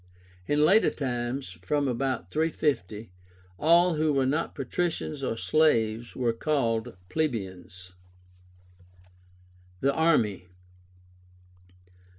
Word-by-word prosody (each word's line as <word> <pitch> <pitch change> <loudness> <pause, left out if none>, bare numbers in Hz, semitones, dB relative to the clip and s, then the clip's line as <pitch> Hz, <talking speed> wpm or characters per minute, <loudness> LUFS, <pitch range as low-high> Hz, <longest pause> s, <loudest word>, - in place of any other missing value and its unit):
In 150 +1 +3
later 200 +7 +5
times 120 - -4
(from 145 +7 0
about 130 -7 -2
350) 135 - -1 0.5
all 170 +1 +4
who 155 0 +2
were 135 -2 +2
not 150 +5 -1
Patricians 155 +1 -2
or 115 -4 -2
slaves 115 -7 +1
were 120 -2 0
called 115 -5 -1
Plebeians. 95 - -4 1.9
THE 140 +1 +2
ARMY. 115 - +1
135 Hz, 90 wpm, -27 LUFS, 110-155 Hz, 1.9 s, later